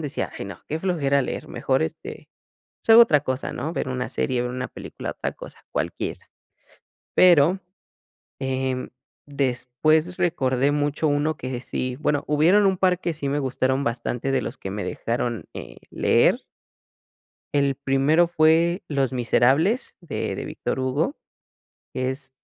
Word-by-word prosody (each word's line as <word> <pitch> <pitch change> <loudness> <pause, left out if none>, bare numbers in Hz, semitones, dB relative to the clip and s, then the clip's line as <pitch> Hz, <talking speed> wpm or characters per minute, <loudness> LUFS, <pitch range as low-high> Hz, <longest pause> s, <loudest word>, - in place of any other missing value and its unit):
decía: 145 -3 -3
"Je - - -7
no, 100 -3 -9
qué 155 - -2
flojera 150 -7 +1
leer, - - -4
mejor, - - 0
este, 80 - -6 0.5
pues - - -1
hago 230 +1 +11
otra 150 -11 +4
cosa," 130 -1 -3
¿no? 160 - -4
Ver 145 - -2
una 125 -1 -3
serie, 125 -2 -1
ver 125 - -3
una 125 0 -3
película, - - -7
otra - - -3
cosa, - - -12
cualquiera. - - -4 0.9
Pero, 175 +1 +5 0.8
em, 130 -1 -2 0.4
después 140 +5 0
recordé 135 -5 +1
mucho 145 +1 0
uno 150 +2 0
que 130 -1 -5
sí, 125 0 -3
bueno, 145 -1 0
hubieron 170 +8 +4
un 190 -1 +2
par 180 -1 +2
que 170 -2 -2
sí 145 -3 -3
me 145 +1 0
gustaron 130 0 0
bastante 120 +2 -2
de 135 - +1
los - - -5
que 95 - -6
me 100 +1 -4
dejaron, 120 0 -3
eh, - - -9
leer. - - +3 1.2
El 140 -1 +2
primero 140 +5 +3
fue 165 +2 +3
Los 135 -3 0
Miserables 135 - +2
de 170 -5 -3
de - - -5
Víctor - - -4
Hugo, 135 - 0 0.8
es 130 +2 -3
140 Hz, 150 wpm, -24 LUFS, 130-160 Hz, 1.2 s, hago